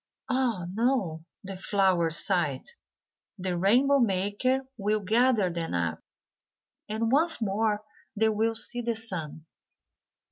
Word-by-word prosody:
"Ah, 245 -8 0
no," 205 -9 -1 0.2
the 195 0 -7
flowers 185 -4 +1
sighed, 170 -9 +2 0.7
"the 185 -1 -3
rainbow 250 +10 +3
maker 205 +5 0
will 210 -1 -1
gather 220 -1 +2
them 165 - -4
up, 85 -2 -2 0.9
and 225 +2 -1
once 320 +3 +4
more 210 0 -1 0.3
they 220 +1 +2
will 220 +1 0
see 240 +2 +3
the 235 -1 -2
sun." 165 -8 -6
210 Hz, 115 wpm, -27 LUFS, 180-235 Hz, 0.9 s, once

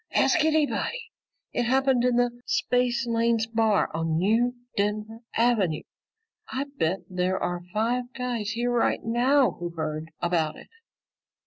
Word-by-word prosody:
Ask 355 -4 +4
anybody. 315 +10 0 0.4
It 240 - 0
happened 265 -1 +3
in 250 -1 +3
the 245 0 +3 0.2
Spacelanes 235 -2 +1
Bar 225 -2 +1
on 160 0 0
New 225 +7 +2 0.2
Denver 210 +2 -1 0.2
Avenue. 220 -9 +2 0.7
I 270 +2 -2
bet 180 -3 0
there 185 0 0
are 175 0 -2
five 235 +5 0
guys 240 -5 -2
here 240 +1 -1
right 240 -1 +1
now 245 +1 +3
who 175 0 -3
heard 155 -1 -4
about 165 -3 0
it!" - - -14
230 Hz, 130 wpm, -26 LUFS, 185-245 Hz, 0.7 s, Ask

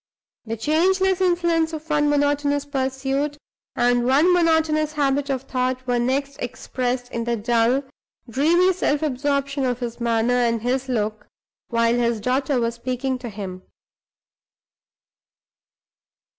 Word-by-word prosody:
The 225 0 -4
changeless 375 - +2
influence 340 -3 +2
of 315 0 -6
one 295 -1 +2
monotonous 290 0 +1
pursuit 270 +1 -2 0.4
and 245 0 +2
one 285 +8 +4
monotonous 320 -3 +2
habit 285 -1 0
of 265 -2 -1
thought 255 -1 -2
was 245 -1 +1
next 275 +3 -1
expressed 245 0 -3
in 235 0 -3
the 235 0 0
dull, 235 +4 +1 0.4
dreamy 335 +10 +3
self 300 -4 0
absorption 280 0 -1
of 250 -2 0
his 240 -1 -5
manner 235 +1 +1
and 235 -2 +1
his 260 +2 -1
look 215 -3 -2 0.4
while 230 0 +2
his 235 -2 +1
daughter 260 +4 0
was 230 0 0
speaking 255 +2 -3
to 245 -1 -6
him. 195 -3 -7
265 Hz, 130 wpm, -22 LUFS, 240-295 Hz, 0.4 s, one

